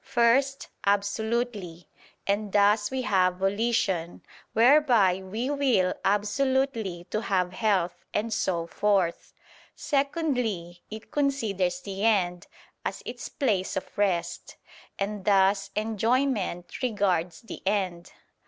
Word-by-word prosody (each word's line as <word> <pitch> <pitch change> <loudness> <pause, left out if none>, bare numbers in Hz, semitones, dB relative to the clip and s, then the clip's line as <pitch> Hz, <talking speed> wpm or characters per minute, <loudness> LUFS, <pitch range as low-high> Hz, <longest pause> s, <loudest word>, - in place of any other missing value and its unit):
First, 265 +4 +2 0.2
absolutely; 205 -3 -1 0.4
and 205 +1 -1
thus 210 +1 +3
we 260 -1 -2
have 185 -6 +2
"volition," 195 -3 0 0.3
whereby 235 -7 +4
we 220 +8 -3
will 255 -11 +2
absolutely 210 -2 0
to 215 - -1
have 185 -4 0
health, 185 -5 0
and 220 +2 -1
so 170 -5 0
forth. 190 -1 0 0.4
Secondly, 250 - -1
it 220 +1 -9
considers 205 -11 0
the 195 +1 -5
end, 180 -5 +1 0.4
as - - -4
its - - -6
place 210 -10 -1
of 190 - -6
rest; 190 -4 -1 0.4
and 200 0 -3
thus 195 0 +3
"enjoyment" 220 -4 -1
regards 195 -8 0
the 225 - -9
end. 185 -4 -1
205 Hz, 105 wpm, -27 LUFS, 185-235 Hz, 0.4 s, whereby